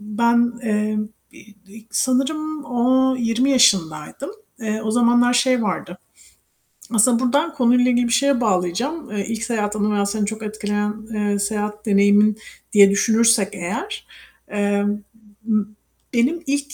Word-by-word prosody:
ben, 235 Hz, +3 st, +1 dB
eee, 215 Hz, -1 st, -1 dB, 0.3 s
i 210 Hz, -, -17 dB
ilk 220 Hz, +3 st, -10 dB
sanırım 295 Hz, +4 st, -1 dB
o 260 Hz, +1 st, +1 dB
20 240 Hz, +2 st, 0 dB
yaşındaydım. 230 Hz, -, +1 dB, 0.3 s
Eee 220 Hz, 0 st, -3 dB
o 215 Hz, -, -1 dB
zamanlar 240 Hz, +1 st, +3 dB
şey 245 Hz, 0 st, +2 dB
vardı. 185 Hz, -3 st, -4 dB, 1.0 s
Aslında 230 Hz, +2 st, +4 dB
buradan 290 Hz, +6 st, +1 dB
konuyla 250 Hz, -2 st, +3 dB
ilgili 245 Hz, 0 st, +1 dB
bir 235 Hz, -, -1 dB
şeye 280 Hz, -2 st, +2 dB
bağlayacağım. 230 Hz, -, -1 dB
Eee, 205 Hz, -2 st, -3 dB
ilk 225 Hz, 0 st, -4 dB
seyahat 215 Hz, -3 st, -2 dB
anı 210 Hz, 0 st, 0 dB
veya 200 Hz, -1 st, +1 dB
seni 205 Hz, +1 st, -1 dB
çok 220 Hz, +2 st, -6 dB
etkileyen, 210 Hz, -1 st, -3 dB, 0.2 s
eee, 205 Hz, -1 st, -1 dB
seyahat 210 Hz, +1 st, -3 dB
deneyimin 205 Hz, +1 st, +3 dB, 0.4 s
diye 200 Hz, -2 st, +7 dB
düşünürsek 220 Hz, 0 st, +3 dB
eğer 230 Hz, -, -5 dB, 0.4 s
emm, 205 Hz, 0 st, -1 dB, 0.5 s
m 215 Hz, -2 st, +1 dB, 0.5 s
benim 275 Hz, +9 st, 0 dB
ilk 285 Hz, +1 st, -2 dB
225 Hz, 135 wpm, -20 LUFS, 210-250 Hz, 1.0 s, diye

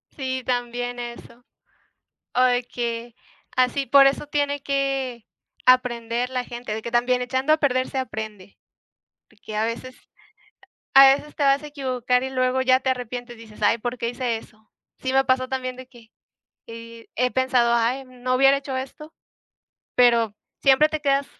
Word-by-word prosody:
Sí, 260 Hz, -2 st, -3 dB
también 245 Hz, 0 st, -2 dB
eso. 240 Hz, 0 st, -9 dB, 0.9 s
O 250 Hz, -, +3 dB
de 250 Hz, -1 st, +3 dB
que, 235 Hz, -1 st, -4 dB, 0.4 s
así 255 Hz, +2 st, +1 dB
por 275 Hz, +2 st, +7 dB
eso 275 Hz, +2 st, +1 dB
tiene 285 Hz, -1 st, -1 dB
que 270 Hz, -4 st, -2 dB, 0.4 s
aprender 245 Hz, -1 st, +2 dB
la 250 Hz, -1 st, -2 dB
gente 240 Hz, -3 st, -6 dB
de 220 Hz, -, -5 dB
que 235 Hz, -, -5 dB
también 245 Hz, +1 st, +2 dB
echando 260 Hz, +4 st, 0 dB
a -, -, +5 dB
perder 255 Hz, -3 st, +1 dB
se 265 Hz, -, -4 dB
aprende. 215 Hz, -6 st, -6 dB, 0.7 s
Porque 210 Hz, +1 st, -10 dB
a 215 Hz, +1 st, +1 dB
veces, 250 Hz, +3 st, -5 dB, 1.0 s
a 270 Hz, 0 st, +9 dB
veces 295 Hz, +1 st, -10 dB
te 290 Hz, -, -1 dB
vas 275 Hz, +1 st, +3 dB
a -, -, -6 dB
equivocar. 255 Hz, -3 st, -1 dB
y 265 Hz, -, -3 dB
luego 255 Hz, 0 st, 0 dB
ya 255 Hz, 0 st, +4 dB
te 260 Hz, -, -2 dB
arrepientes, 245 Hz, -1 st, -4 dB
dices: 215 Hz, -2 st, -14 dB
"Ay, 205 Hz, +2 st, +3 dB
¿por 245 Hz, +2 st, -4 dB
qué 235 Hz, -, -2 dB
hice 240 Hz, -2 st, -2 dB
eso?" 215 Hz, 0 st, -17 dB, 0.3 s
Sí, 260 Hz, 0 st, -3 dB
me 270 Hz, 0 st, +3 dB
pasó 255 Hz, 0 st, +1 dB
también 255 Hz, -1 st, -3 dB
de 255 Hz, 0 st, -11 dB
que, 235 Hz, -3 st, -19 dB, 0.6 s
eh, 230 Hz, 0 st, -11 dB
he 250 Hz, +1 st, +1 dB
pensado: 255 Hz, -2 st, +2 dB
"Ay, 240 Hz, +3 st, 0 dB
no 255 Hz, 0 st, -3 dB
hubiera 270 Hz, +1 st, +5 dB
hecho 275 Hz, -1 st, -5 dB
esto", 275 Hz, +4 st, -7 dB, 0.8 s
pero 235 Hz, -4 st, +4 dB, 0.3 s
siempre 275 Hz, +2 st, +5 dB
te 310 Hz, 0 st, -4 dB
quedas, 280 Hz, -1 st, +1 dB
255 Hz, 170 wpm, -23 LUFS, 235-265 Hz, 1.0 s, a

